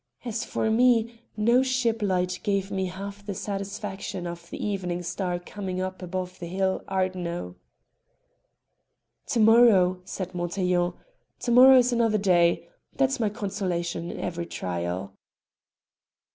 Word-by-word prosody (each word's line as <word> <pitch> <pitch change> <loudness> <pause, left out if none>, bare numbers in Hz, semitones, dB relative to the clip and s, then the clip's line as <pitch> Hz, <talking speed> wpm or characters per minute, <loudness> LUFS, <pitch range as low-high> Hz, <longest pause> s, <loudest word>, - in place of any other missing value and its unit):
As 230 -2 -2
for 220 - -1
me, 235 -1 +3 0.2
no 235 +4 +4
ship 250 -4 0
light 180 -2 0
gave 200 -2 -1
me 190 -1 -1
half 200 +2 -7
the 200 -1 -5
satisfaction 200 -1 -5
of 170 0 -7
the - - -6
evening 180 -4 -2
star 180 0 -2
coming 185 +1 -5
up 185 0 -4
above 180 0 -5
the 175 - -6
hill 190 +2 0
Ardno." 180 - -2 1.7
"To 250 -5 0
morrow," 215 -5 +5
said 185 0 -6
Montaiglon 175 0 0 0.5
"to 240 - -1
morrow 260 +2 +9
is 250 0 +4
another 230 -2 +2
day; 175 -4 +3 0.3
that's 270 -1 +1
my 220 -3 +1
consolation 180 -5 -3
in - - -6
every 170 -1 -4
trial." 90 +2 -4
190 Hz, 130 wpm, -26 LUFS, 180-220 Hz, 1.7 s, morrow